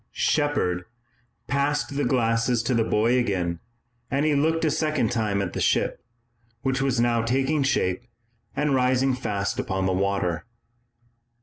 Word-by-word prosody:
Shepard 110 - 0 0.6
passed 140 0 -1
the 145 - 0
glasses 115 -1 +1
to 125 +2 0
the 115 -1 +3
boy 115 +3 +2
again, 90 -7 -1 0.5
and 140 +2 0
he 155 - +3
looked 160 +3 +1
a 155 - +2
second 155 -7 0
time 105 -4 0
at 90 - -5
the - - -3
ship, - - +1 0.6
which 135 0 0
was 135 -3 +1
now 120 -1 +2
taking 135 +6 +1
shape 95 -7 +1 0.5
and 150 -1 +1
rising 130 +1 +2
fast 100 -5 -2
upon 95 0 -1
the 95 - +1
water. 95 -1 -1
120 Hz, 145 wpm, -25 LUFS, 100-140 Hz, 0.6 s, the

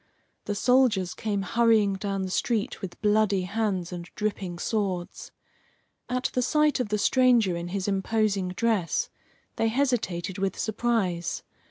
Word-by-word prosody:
The 205 - -2
soldiers 235 -6 +3
came 205 -3 -2
hurrying 220 -1 +3
down 195 0 -2
the 185 - -4
street 220 +1 -1
with 180 -2 -7
bloody 210 -2 +3
hands 190 -3 -1
and 170 -1 -7
dripping 200 -4 -3
swords. 190 -3 -3 0.8
At 250 +1 -1
the 250 - +1
sight 300 +3 +2
of 250 - -1
the 210 - +1
stranger 235 -4 +3
in 170 0 -4
his 190 +2 -3
imposing 200 -1 0
dress 200 -2 0 0.5
they 225 - +2
hesitated 220 -8 -1
with 195 0 -1
surprise. 215 -6 -1
205 Hz, 140 wpm, -27 LUFS, 185-230 Hz, 0.8 s, soldiers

